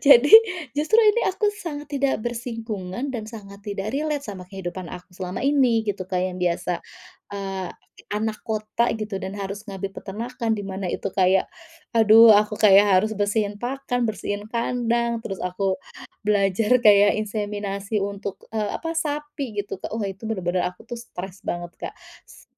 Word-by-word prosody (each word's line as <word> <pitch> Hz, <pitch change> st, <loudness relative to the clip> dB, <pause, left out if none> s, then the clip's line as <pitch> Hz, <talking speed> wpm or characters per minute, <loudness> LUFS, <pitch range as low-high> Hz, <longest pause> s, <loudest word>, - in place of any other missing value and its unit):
Jadi 280 Hz, -, +7 dB, 0.4 s
justru 310 Hz, +9 st, +3 dB
ini 435 Hz, +1 st, +5 dB
aku 415 Hz, +2 st, +1 dB
sangat 300 Hz, -7 st, -6 dB
tidak 275 Hz, -4 st, +1 dB
bersinggungan 230 Hz, -1 st, -4 dB
dan 225 Hz, -3 st, -4 dB
sangat 200 Hz, -3 st, -10 dB
tidak 205 Hz, +1 st, -4 dB
relate 300 Hz, -1 st, -1 dB
sama 190 Hz, -5 st, -7 dB
kehidupan 185 Hz, -2 st, -6 dB
aku 180 Hz, +1 st, -10 dB
selama 185 Hz, -1 st, -4 dB
ini 255 Hz, -6 st, +3 dB
gitu 195 Hz, -2 st, -2 dB
kayak 185 Hz, -1 st, -1 dB
yang -, -, -7 dB
biasa, 175 Hz, 0 st, 0 dB, 0.6 s
eee, 195 Hz, -2 st, -4 dB, 0.4 s
anak 215 Hz, +1 st, -1 dB
kota 215 Hz, +2 st, 0 dB
gitu 215 Hz, -2 st, -4 dB
dan 190 Hz, +1 st, -5 dB
harus 200 Hz, +1 st, -5 dB
ngambil 195 Hz, 0 st, -4 dB
peternakan 230 Hz, +3 st, -3 dB
di 205 Hz, -, -5 dB
mana 190 Hz, -1 st, -4 dB
itu 195 Hz, -, -2 dB
kayak, 190 Hz, 0 st, +3 dB, 0.5 s
aduh, 225 Hz, 0 st, +8 dB
aku 210 Hz, +1 st, +3 dB
kayak 200 Hz, -2 st, +7 dB
harus 215 Hz, +2 st, -1 dB
bersihin 205 Hz, 0 st, 0 dB
pakan, 245 Hz, -1 st, -2 dB
bersihin 205 Hz, -1 st, -3 dB
kandang, 235 Hz, -1 st, 0 dB
terus 195 Hz, -, -5 dB
aku 190 Hz, +1 st, 0 dB, 0.5 s
belajar 210 Hz, +3 st, +3 dB
kayak 205 Hz, -1 st, +7 dB
inseminasi 205 Hz, -1 st, -3 dB
untuk, 200 Hz, 0 st, -5 dB
e -, -, -4 dB, 0.2 s
apa 330 Hz, -1 st, -3 dB
sapi 295 Hz, -6 st, -3 dB
gitu 200 Hz, -, -6 dB
Kak. -, -, -6 dB
Wah, 205 Hz, -3 st, -1 dB
itu 195 Hz, +3 st, -9 dB
bener-bener 185 Hz, -4 st, -1 dB
aku 180 Hz, +5 st, -15 dB
tuh 240 Hz, -, -5 dB
stres 190 Hz, -4 st, -8 dB
banget 175 Hz, 0 st, -4 dB
Kak. -, -, -5 dB, 0.3 s
S -, -, -17 dB
210 Hz, 160 wpm, -24 LUFS, 195-235 Hz, 0.6 s, aduh